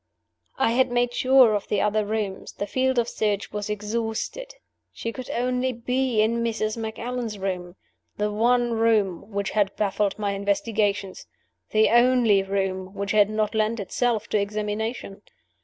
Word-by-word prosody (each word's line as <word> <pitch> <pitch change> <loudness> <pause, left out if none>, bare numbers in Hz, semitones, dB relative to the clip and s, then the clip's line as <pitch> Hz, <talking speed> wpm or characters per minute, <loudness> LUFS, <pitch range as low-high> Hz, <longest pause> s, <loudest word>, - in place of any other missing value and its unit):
I 225 - +2
had 255 +2 +3
made 245 0 +1
sure 255 -3 +5
of 205 -1 -2
the 205 - 0
other 210 +1 +1
rooms; 210 -3 -3
the 205 - -4
field 260 +4 0
of 235 -1 +2
search 210 -3 -1
was 210 0 -4
exhausted. 225 - -3 0.4
She 230 - -5
could 255 -2 -8
only 250 +1 0
be 250 -1 0
in 230 +2 0
Mrs. 215 -2 -1
Macallan's 230 0 -4
room 180 -2 -4 0.4
the 210 0 0
one 240 +3 +2
room 220 -5 +1
which 200 -1 -2
had 205 -2 +1
baffled 205 -1 0
my 205 -2 -1
investigations; 200 0 -1 0.4
the 215 0 +4
only 240 -4 +5
room 190 -1 -3
which 200 0 -3
had 210 -1 +4
not 215 0 -1
lent 220 +1 0
itself 225 +2 -1
to 210 - +2
examination. 210 0 -3
215 Hz, 155 wpm, -24 LUFS, 200-235 Hz, 0.4 s, sure